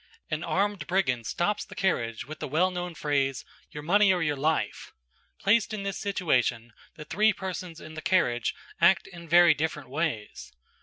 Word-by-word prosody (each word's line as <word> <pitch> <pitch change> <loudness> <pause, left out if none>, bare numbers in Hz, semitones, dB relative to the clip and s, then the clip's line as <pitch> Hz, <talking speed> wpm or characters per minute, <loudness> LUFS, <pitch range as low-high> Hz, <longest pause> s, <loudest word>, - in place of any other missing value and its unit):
An 155 +1 -2
armed 200 +1 -1
brigand 135 - 0
stops 205 +4 -1
the - - -12
carriage 115 - -1
with 155 +2 -9
the - - -4
well 170 +7 +2
known 180 -1 -5
phrase, 140 -4 -1 0.2
"Your 150 - -8
money 200 +4 +4
or 180 -2 +1
your 150 -2 0
life." 155 +3 -1 0.5
Placed 215 +2 +2
in 200 - -5
this 195 -1 -3
situation, 125 - 0 0.2
the 150 - -9
three 215 +7 +3
persons 180 -3 -6
in 155 - -10
the 155 - -7
carriage 120 -12 +1 0.2
act 180 +3 +5
in 170 -3 -12
very 175 0 +7
different 150 -2 -3
ways. 110 - -3
165 Hz, 170 wpm, -27 LUFS, 145-190 Hz, 0.5 s, very